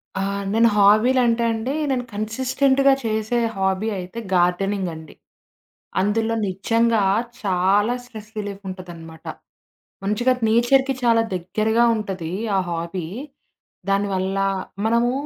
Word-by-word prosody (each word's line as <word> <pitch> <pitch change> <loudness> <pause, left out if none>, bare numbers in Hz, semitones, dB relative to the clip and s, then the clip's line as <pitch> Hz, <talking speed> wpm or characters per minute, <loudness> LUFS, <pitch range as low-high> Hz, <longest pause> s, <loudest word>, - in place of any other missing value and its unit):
ఆ! 190 - -1 0.3
నేను 230 +1 +5
హాబీలంటే 230 +3 +4
అండి 225 +4 -3 0.2
నేను 250 -2 0
కన్సిస్టెంట్‌గా 260 +5 +2
చేసే 220 +2 0 0.2
హాబీ 190 +3 0
అయితే 185 +5 -6
గార్డెనింగ్ 185 +1 +1
అండి. 160 -1 -12 0.9
అందులో 220 +3 0
నిజంగా 225 +3 +1 0.4
చాలా 195 +4 +2
స్ట్రెస్ 215 -3 -11
రిలీఫ్ 205 -1 -5
ఉంటదనమాట. 170 -3 -10 0.8
మంచిగా 225 +6 +2
నేచర్‌కి 265 +4 +3
చాలా 230 -1 +4
దగ్గరగా 215 +6 +1
ఉంటది 190 -6 -4 0.3
ఆ - - +3
హాబీ. 170 +1 -4 0.8
దానివల్ల 195 -1 0 0.5
మనము 235 +2 +2
210 Hz, 100 wpm, -22 LUFS, 190-235 Hz, 0.9 s, నేను